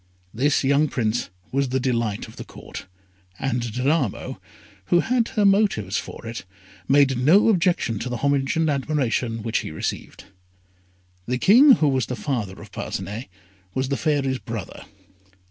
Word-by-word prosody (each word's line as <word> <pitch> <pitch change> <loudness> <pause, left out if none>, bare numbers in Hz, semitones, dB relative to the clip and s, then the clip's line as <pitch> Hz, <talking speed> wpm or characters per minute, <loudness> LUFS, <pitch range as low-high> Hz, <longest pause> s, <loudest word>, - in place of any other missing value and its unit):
This 145 +6 +1
young 140 +3 +3
Prince 120 -4 -1 0.2
was 140 0 0
the 130 +1 0
delight 115 -5 -1
of - - -15
the - - -6
Court, - - -10 0.5
and 125 -2 -1
Danamo, 130 - -1 0.5
who 175 - +3
had 240 -1 +1
her 215 -5 0
motives 195 - +2
for - - -7
it, 115 +1 -6 0.4
made 135 -2 +4
no 170 - +5
objection 170 - +1
to 125 - -4
the 125 - -3
homage 140 +2 +1
and 165 -1 +2
admiration 130 -6 -1
which 115 0 0
he - - -5
received. 80 - -5 1.0
The 125 +1 0
King 250 - +7
who 155 - +2
was 130 -4 +1
the 125 - -3
father 115 -9 -3
of - - -14
Parcinet 110 +6 -5 0.5
was 130 0 -1
the 140 - 0
Fairy's 135 -4 0
brother. 110 -5 -7
135 Hz, 155 wpm, -23 LUFS, 115-155 Hz, 1.0 s, King